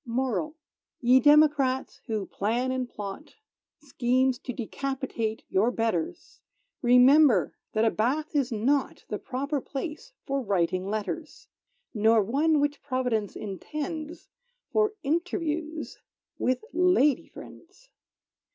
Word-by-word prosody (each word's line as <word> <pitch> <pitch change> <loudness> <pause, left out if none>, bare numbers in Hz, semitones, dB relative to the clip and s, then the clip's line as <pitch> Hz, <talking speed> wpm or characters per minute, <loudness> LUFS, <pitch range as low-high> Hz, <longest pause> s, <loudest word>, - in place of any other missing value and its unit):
MORAL 260 +5 -2 0.4
Ye 250 +1 +5
democrats, 290 -2 +3
who 215 -4 -2
plan 235 +8 -1
and 255 -1 -2
plot 210 +9 -8 0.4
Schemes 255 -2 0
to 260 - -5
decapitate 250 -2 -3
your 205 +5 +2
betters, 225 -9 -3 0.4
Remember 250 - +5 0.2
that 220 +1 +2
a 225 - +3
bath 295 +8 -1
is 270 -3 +1
not 260 +6 0
The 210 - -3
proper 275 +2 -3
place 310 - -6
for 275 0 -1
writing 185 -4 0
letters; 215 - -5 0.4
Nor 220 -1 +4
one 295 +8 +2
which 290 0 -1
Providence 250 -6 -1
intends 305 - -6 0.4
For 425 -1 +2
interviews 320 0 -2 0.4
with 255 - 0
lady 355 -7 +3
friends. - - -14
260 Hz, 110 wpm, -27 LUFS, 225-300 Hz, 0.4 s, Ye